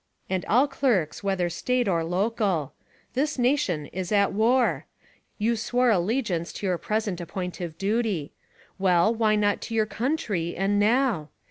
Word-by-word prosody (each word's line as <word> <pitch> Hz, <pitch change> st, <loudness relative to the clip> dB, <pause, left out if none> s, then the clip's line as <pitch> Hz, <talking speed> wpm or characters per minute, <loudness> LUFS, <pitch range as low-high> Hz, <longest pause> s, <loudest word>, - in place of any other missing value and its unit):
And 185 Hz, -1 st, 0 dB
all 255 Hz, +6 st, +4 dB
clerks 230 Hz, -, 0 dB
whether 190 Hz, -3 st, 0 dB
State 245 Hz, +7 st, -1 dB
or 170 Hz, -3 st, +1 dB
local: 185 Hz, -, 0 dB, 0.4 s
This 285 Hz, +4 st, 0 dB
nation 240 Hz, -, +1 dB
is 185 Hz, +4 st, -5 dB
at 200 Hz, -1 st, +3 dB
war! 235 Hz, +4 st, +2 dB, 0.5 s
You 225 Hz, +2 st, +1 dB
swore 245 Hz, +2 st, +1 dB
allegience 190 Hz, -3 st, 0 dB
to -, -, -6 dB
your 180 Hz, -3 st, 0 dB
present 210 Hz, -4 st, -2 dB
appointive 175 Hz, -1 st, -5 dB
duty 200 Hz, -7 st, -1 dB, 0.2 s
— -, -, -27 dB
well, 185 Hz, +2 st, +3 dB
why 220 Hz, -2 st, +2 dB
not 205 Hz, -1 st, +1 dB
to 225 Hz, -, -5 dB
your 220 Hz, -1 st, +3 dB
country; 215 Hz, -, -2 dB
and 200 Hz, +2 st, +1 dB
now? 215 Hz, -, +2 dB
205 Hz, 150 wpm, -26 LUFS, 180-235 Hz, 0.5 s, all